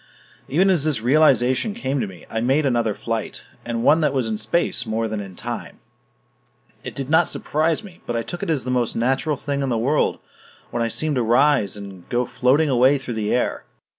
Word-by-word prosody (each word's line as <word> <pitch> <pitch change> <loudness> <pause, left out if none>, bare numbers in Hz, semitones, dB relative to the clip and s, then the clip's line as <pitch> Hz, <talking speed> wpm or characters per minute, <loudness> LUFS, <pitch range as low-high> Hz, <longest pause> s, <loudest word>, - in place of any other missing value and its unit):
Even 185 +8 +3
as 170 -6 +2
this 150 -8 0
realization 130 - +3
came 140 - -2
to 110 - -2
me, 90 -4 -12
I 110 - -3
made 135 +5 +2
another 120 -5 +1
flight 115 -2 -4 0.2
and 115 -1 -3
one 160 +5 +5
that 145 -3 +1
was 130 -3 +1
in 110 -1 -2
space 125 +1 0
more 110 +1 -1
than 110 -1 -3
in 95 -2 -8
time. - - -6 1.0
It - - -7
did 135 -2 -4
not 160 +3 +4
surprise 160 +6 0
me, 185 -4 -13
but 120 - -2
I 115 - -1
took 175 +7 -7
it - - -3
as 145 -7 0
the 125 - -3
most 125 -2 0
natural 135 +5 0
thing 140 0 -3
in 135 - -1
the 120 - 0
world 135 +7 +1 0.5
when 120 - -2
I 115 - +1
seemed 150 +5 -1
to - - +2
rise 120 -3 +3
and 95 -3 -10
go 120 +1 0
floating 130 +6 +2
away 130 +1 +4
through 130 -3 -6
the 105 -2 -2
air. 125 - 0
125 Hz, 215 wpm, -22 LUFS, 115-150 Hz, 1.0 s, one